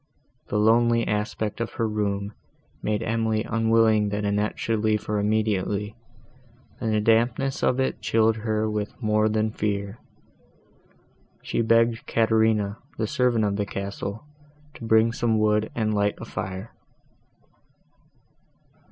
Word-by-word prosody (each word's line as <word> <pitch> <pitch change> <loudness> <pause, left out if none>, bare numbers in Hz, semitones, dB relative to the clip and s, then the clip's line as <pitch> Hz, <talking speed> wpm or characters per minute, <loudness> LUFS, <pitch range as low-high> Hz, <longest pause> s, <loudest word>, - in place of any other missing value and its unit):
The 105 - -1
lonely 115 +2 +3
aspect 105 +1 -2
of 115 - -3
her 115 - -1
room 100 -1 -2 0.5
made 105 -1 -1
Emily 110 -1 0
unwilling 110 -2 +2
that 105 0 -2
Annette 105 +1 0
should 115 -1 -1
leave 105 0 +1
her 105 -1 -1
immediately, 105 -1 0 0.8
and 115 - -1
the 110 - +2
dampness 115 +5 +1
of 125 - +2
it 130 - -1
chilled 110 0 +2
her 110 0 -1
with 105 -1 -4
more 110 -2 +2
than 110 0 0
fear. 100 0 -3 1.4
She - - -1
begged 115 0 +2
Caterina, 110 -2 +2 0.2
the 110 - 0
servant 120 -1 +1
of 100 -1 -1
the 105 - -1
castle, 100 +3 -5 0.5
to - - -12
bring 110 +1 +4
some 115 -2 +1
wood 105 0 +2
and 110 -2 0
light 105 0 +1
a - - -8
fire. 95 +3 -6
110 Hz, 135 wpm, -25 LUFS, 105-115 Hz, 1.4 s, bring